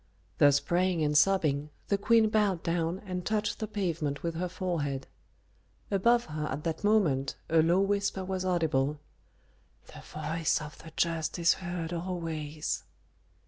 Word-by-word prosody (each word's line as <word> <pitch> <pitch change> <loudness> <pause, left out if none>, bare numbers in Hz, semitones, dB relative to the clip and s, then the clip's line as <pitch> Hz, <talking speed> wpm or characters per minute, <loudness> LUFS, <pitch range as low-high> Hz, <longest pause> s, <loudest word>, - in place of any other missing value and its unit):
Thus 145 -1 +6
praying 175 +2 +1
and 150 0 +1
sobbing, 150 -4 +3 0.2
the 200 - +3
queen 225 +1 +4
bowed 205 -5 +1
down 170 +2 -1
and 180 -2 -4
touched 215 +2 -1
the 215 - -3
pavement 165 -9 -2
with 170 -1 -1
her 180 +2 -2
forehead. 150 -8 -2 0.9
Above 235 +5 +3
her 150 -1 -4
at 150 - -4
that 165 +2 -3
moment 165 -11 +2 0.2
a 165 -1 +6
low 170 +4 +3
whisper 200 -1 0
was 190 0 -2
audible, 155 -5 +1 0.9
"The - - -10
voice 165 -1 -1
of 150 -1 -9
the 160 - -11
just 165 -1 0
is 170 -1 +4
heard 175 -2 -4
always." 165 -4 -3
170 Hz, 145 wpm, -29 LUFS, 155-190 Hz, 0.9 s, Thus